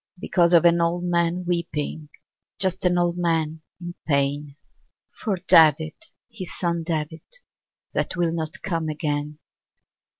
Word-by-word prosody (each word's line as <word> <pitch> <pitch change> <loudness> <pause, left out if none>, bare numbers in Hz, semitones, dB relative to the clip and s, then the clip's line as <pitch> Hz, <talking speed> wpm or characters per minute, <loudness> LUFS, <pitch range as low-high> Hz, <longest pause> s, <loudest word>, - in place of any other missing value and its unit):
Because 175 -2 +2
of 170 0 +6
an 170 0 +5
old 170 +1 0
man 175 0 0
weeping, 160 -3 -3 0.5
Just 190 -1 0
an 180 0 +3
old 175 0 +1
man 160 -2 0 0.2
in 175 -1 -6
pain. 140 0 0 0.6
For 210 -5 -2
David, 155 -1 +6 0.3
his 190 -6 -8
son 170 -2 -1
David, 160 -1 -3 0.7
That - - -1
will 170 -2 +1
not 160 -2 -5
come 165 -4 -2
again. 150 -1 -3
170 Hz, 130 wpm, -24 LUFS, 155-175 Hz, 0.7 s, of